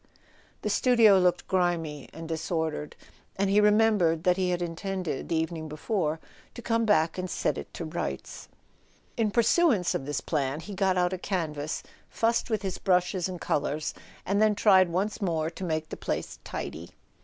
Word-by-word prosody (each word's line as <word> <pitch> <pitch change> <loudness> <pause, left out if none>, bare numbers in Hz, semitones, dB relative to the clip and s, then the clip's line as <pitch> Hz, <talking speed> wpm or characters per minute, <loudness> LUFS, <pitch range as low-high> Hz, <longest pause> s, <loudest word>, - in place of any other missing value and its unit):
The - - 0
studio 230 -6 +5
looked 180 -1 +1
grimy 170 -6 -1
and 165 0 -8
disordered, 160 -2 -3 0.4
and 195 0 +1
he 205 +1 +5
re¬ 210 0 +6
membered 205 -7 +3
that 180 0 +4
he 185 -1 0
had 175 -1 0
intended, 175 -2 -4
the 165 - +1
evening 160 -1 -2
before, 155 0 -1 0.4
to 240 - -7
come 230 -1 +1
back 165 -4 +2
and 185 0 -3
set - - 0
it - - -7
to 165 - -4
rights. 155 - -5 0.7
In 225 -2 +1
pursuance 235 - +3
of 135 - -3
this 145 -1 -1
plan, 145 -2 -1
he 200 +5 -8
got 190 -1 +1
out 180 0 +2
a 185 - -3
canvas, 155 -6 -3 0.3
fussed 230 +2 0
with 215 -2 -1
his 190 -2 -3
brushes 180 -1 +1
and 180 -1 -6
colours, 150 0 -1 0.3
and 200 +2 +1
then 215 -1 +4
tried 190 -3 +5
once 200 +6 -2
more 165 -4 0
to 190 - -8
make 155 -2 -2
the - - -6
place - - -4
tidy. 85 +2 -6
180 Hz, 180 wpm, -28 LUFS, 160-200 Hz, 0.7 s, re¬